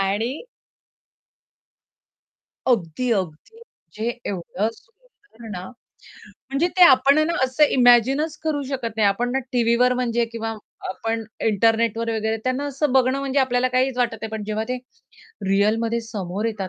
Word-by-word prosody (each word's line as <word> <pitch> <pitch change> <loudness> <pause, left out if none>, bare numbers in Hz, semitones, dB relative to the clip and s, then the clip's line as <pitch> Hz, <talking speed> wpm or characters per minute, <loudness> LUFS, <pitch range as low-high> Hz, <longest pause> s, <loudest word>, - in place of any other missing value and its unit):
आणि 215 +8 -1 2.2
अगदी, 235 0 0
अगदी. 190 - -4
म्हणजे 230 - -7 0.2
एवढं 195 +2 -2
सुंदर 410 - -18
ना 180 -2 -6 0.9
म्हणजे 275 +5 +1
ते 365 - +5
आपण 275 0 +6
आहे 310 - +3
ना 340 - 0
असं 260 +4 +3
इमॅजिनचं 260 +5 +4
करू 300 -2 0
शकत 240 -5 -4
नाही. 215 -2 +4
आपण 240 +5 0
ना 265 - +1
टीव्हीवर 240 +1 +3
म्हणजे 240 -1 0
किंवा 225 -1 -4 0.3
आपण 225 +4 -3 0.2
इंटरनेटवर 225 +1 +2
वगैरे 220 0 -1
त्यांना 255 +2 -1
असं 285 0 -1
बघणं 260 0 +3
म्हणजे 275 0 -1
आपल्याला 255 -1 +1
काहीच 255 +1 +1
वाटत 240 -2 +1
नाही. 220 - -4
पण 220 -1 -5
जेव्हा 215 +1 -2
ते 255 - -1 0.7
रिअलमध्ये 225 +4 +1
समोर 205 -3 -5
येतात 205 -4 -3
235 Hz, 140 wpm, -22 LUFS, 220-260 Hz, 2.2 s, आपण